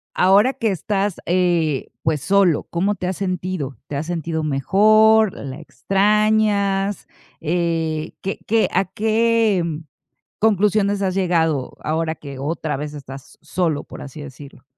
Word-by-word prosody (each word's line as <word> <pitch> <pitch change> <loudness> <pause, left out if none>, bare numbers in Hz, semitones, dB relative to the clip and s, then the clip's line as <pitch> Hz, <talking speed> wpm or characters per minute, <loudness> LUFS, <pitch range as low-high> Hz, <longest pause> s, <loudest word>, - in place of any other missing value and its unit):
ahora 200 +8 +4
que 225 -5 -1
estás, 195 +2 -1
eh, 170 -5 +1
pues 155 -3 0
solo. 190 -1 +3
¿Cómo 195 +4 0
te 185 - -5
has 185 0 -2
sentido? 180 -7 -3
¿Te 145 - -5
has 150 +3 -3
sentido 165 -2 -3
mejor? 215 +8 +4
¿La 135 +1 -7
extrañas? 200 +1 +1 0.3
Eh. 165 -1 -1
¿Qué? 195 - -4
¿Qué? 225 +1 +3
¿A 190 +2 +2
qué 220 0 +1 0.8
conclusiones 205 -1 +2
has 190 -2 0
llegado 165 -7 0
ahora 160 +1 -1
que 140 -4 -10
otra 150 +1 -3
vez 150 +2 -5
estás 135 -2 -11
solo, 155 -2 -1
por - - -10
así 145 +2 -9
decirlo? 140 0 -11
180 Hz, 135 wpm, -21 LUFS, 155-200 Hz, 0.8 s, ahora